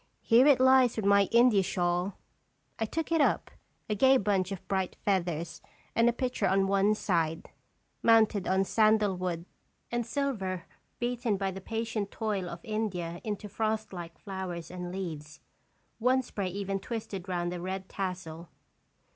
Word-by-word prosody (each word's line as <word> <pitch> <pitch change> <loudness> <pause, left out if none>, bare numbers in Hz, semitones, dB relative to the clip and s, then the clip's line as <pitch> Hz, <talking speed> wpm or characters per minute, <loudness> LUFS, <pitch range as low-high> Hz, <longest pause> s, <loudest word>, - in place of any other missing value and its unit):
Here 245 +4 +6
it 280 -4 +6
lies 260 -2 +5
with 220 - -2
my 200 -1 +5
India 235 -3 +5
shawl." 180 +1 -1 0.6
I 225 - +1
took 325 +9 -3
it 325 -2 +3
up, - - +1 0.4
a 215 - 0
gay 265 +5 +5
bunch 195 -4 0
of 195 - -7
bright 190 -2 -1
feathers 170 -4 -1 0.3
with 230 +1 +5
a - - +3
picture 250 +1 -1
on 195 0 +3
one 200 +2 +3
side, 165 -6 -1 0.5
mounted 220 -4 +4
on 190 +1 +3
sandal 215 -1 +3
wood 175 -2 -3 0.5
and 240 0 0
silver 220 -9 -2 0.3
beaten 240 -3 -1
by 195 0 -1
the 190 +1 -8
patient 225 -1 -3
toil 200 -5 -2
of 170 - -8
India 190 -6 -3
into 210 -1 -4
frostlike 205 -5 -3
flowers 185 -4 -6
and 180 -1 -6
leaves, 155 -5 -6 0.6
one 255 +3 +3
spray 200 -5 -4
even 195 +1 -3
twisted 200 -3 -6
round 175 -1 -1
the 175 -1 -5
red 190 +1 -4
tassel. 180 -4 -5
195 Hz, 155 wpm, -29 LUFS, 180-225 Hz, 0.6 s, Here